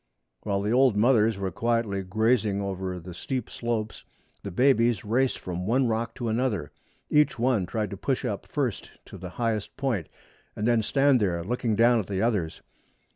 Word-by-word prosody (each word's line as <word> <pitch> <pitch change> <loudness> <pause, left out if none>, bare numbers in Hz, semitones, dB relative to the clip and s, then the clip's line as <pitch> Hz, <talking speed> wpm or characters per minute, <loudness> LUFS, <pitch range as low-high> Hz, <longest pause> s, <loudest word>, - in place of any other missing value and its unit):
While 100 -1 -1
the 105 - 0
old 125 -3 +4
mothers 110 -2 +4
were 95 -1 -3
quietly 115 -1 0
grazing 110 +1 +1
over 95 -2 -3
the 90 +1 -9
steep 130 +9 -4
slopes 115 -2 -3 0.4
the 100 - -5
babies 120 +2 +2
raced 125 +5 +1
from 90 +1 -5
one 125 +3 +2
rock 115 0 -2
to 120 - -4
another. 110 - -1 0.4
Each 150 0 +3
one 115 -6 +1
tried 105 -1 -2
to - - -5
push - - -1
up - - -3
first - - -2 0.2
to - - -11
the 90 +1 -7
highest 115 -3 -2
point, 120 - -1 0.5
and 105 - -1
then 120 -2 +3
stand 135 +3 +3
there, 90 -5 0
looking 115 +2 -1
down 120 +2 +4
at 105 - -4
the 95 -2 -2
others. 100 -8 -1
110 Hz, 180 wpm, -26 LUFS, 100-120 Hz, 0.5 s, old